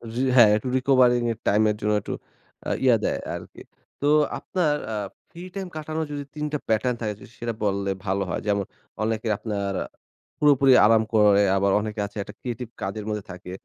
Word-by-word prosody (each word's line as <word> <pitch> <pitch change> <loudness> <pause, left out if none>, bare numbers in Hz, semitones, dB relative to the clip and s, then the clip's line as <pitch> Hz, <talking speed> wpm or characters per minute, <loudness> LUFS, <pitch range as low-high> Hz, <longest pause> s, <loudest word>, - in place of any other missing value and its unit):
জি, 125 - 0
হ্যাঁ, 120 -4 +8
একটু 105 +4 -3
recovering 125 -2 +4
এর 115 - -5
টাইমের 105 +1 +3
জন্য 105 +1 +1
একটু - - -5 0.5
আ - - -1
ইয়া 125 -3 +6
দেয় - - 0 0.2
আরকি। - - -10 0.4
তো - - -1 0.3
আপনার 165 -6 0 0.2
আ - - -2 0.3
ফ্রি 170 - -11
টাইম 195 -1 -4
কাটানোর 155 +1 -3
যদি 145 -1 -4
৩ 150 0 -3
টা - - +2
প্যাটার্ন 115 +3 +1
থাকে। 105 -2 -1
যদি - - -14
সেটা 120 0 -3
বললে, 100 -1 0 0.2
ভালো 95 0 0
হয়। - - -2
যেমন 100 -1 +1 0.4
অনেকে 110 +1 -1
আপনার 100 -3 -3 0.7
পুরোপুরি 140 -2 +5
আরাম 110 0 +5
করে, 105 -2 +5 0.2
আবার 100 0 +2
অনেকে 110 0 -5
আছে 100 +1 -10
একটা - - -11
ক্রিয়েটিভ 125 -1 -5
কাজের 100 +2 -4
মধ্যে 105 -2 -3
থাকে। 90 0 -9
110 Hz, 185 wpm, -24 LUFS, 105-130 Hz, 0.7 s, হ্যাঁ